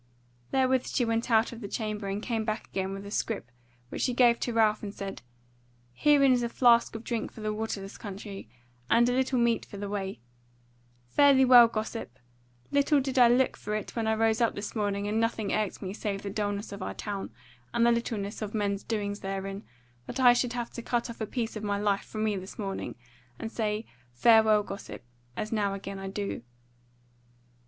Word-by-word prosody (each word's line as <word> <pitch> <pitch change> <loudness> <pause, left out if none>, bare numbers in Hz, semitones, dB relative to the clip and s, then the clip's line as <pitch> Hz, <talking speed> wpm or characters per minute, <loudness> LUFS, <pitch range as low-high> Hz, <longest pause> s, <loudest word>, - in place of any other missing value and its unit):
Therewith 260 -1 +2
she 245 - +1
went 230 +1 -1
out 225 0 +3
of 235 0 -9
the 205 - -5
chamber 210 -1 -3
and 200 +2 -3
came 225 -3 -1
back 215 0 -3
again 190 0 -3
with 195 +1 -6
a 200 - -8
scrip 205 - -2 0.4
which - - -5
she 250 - +1
gave 240 -2 +5
to 240 - -2
Ralph 220 -2 +3
and 205 - -5
said: 195 -1 -6 0.7
"Herein 280 - +5
is 245 - +2
a 235 - -1
flask 235 -2 +4
of 225 - -6
drink 235 -2 -3
for 220 - -11
the 215 0 -1
waterless 210 -2 -5
country, 200 - -8 0.4
and 235 +1 +5
a - - +2
little 260 0 +1
meat 235 -2 +2
for 200 - -10
the 205 0 -4
way. 195 -4 -3 0.9
Fare 285 -1 +6
thee 265 0 +5
well, 245 -2 +9
gossip! 215 - -5 0.5
Little 285 +1 +4
did 265 -1 0
I 245 - +8
look 250 +2 +3
for 210 +1 -4
it 215 - -5
when 225 -2 -1
I 220 - +2
rose 225 +1 +2
up 230 - +2
this 205 +3 -5
morning 205 -1 -1
and 215 +2 0
nothing 225 -2 0
irked 215 -2 -1
me 190 0 -4
save 200 -2 -3
the 200 - -4
dulness 205 0 -2
of 200 -1 -7
our - - -4
town, 200 -2 -4 0.4
and 235 0 +2
the 235 - +5
littleness 225 -3 -2
of 215 0 -4
men's 200 -1 0
doings 205 -2 -2
therein, 195 +1 -4 0.4
that 260 - -5
I 245 -2 +8
should 245 0 0
have 240 -1 -4
to 235 - -6
cut 235 0 -1
off 230 - -11
a 220 - -1
piece 230 -1 -3
of 215 - -4
my 205 -1 0
life 200 -1 0
from 215 -1 -4
me 215 -1 +1
this 190 +1 -8
morning, 195 -2 -4 0.4
and 225 - -5
say, 215 -1 -2 0.3
farewell 220 - +5
gossip, 195 -8 -8 0.3
as 215 - -3
now 205 -3 0
again 195 0 -6
I 195 - -5
do." 200 - -4
215 Hz, 210 wpm, -29 LUFS, 200-235 Hz, 0.9 s, well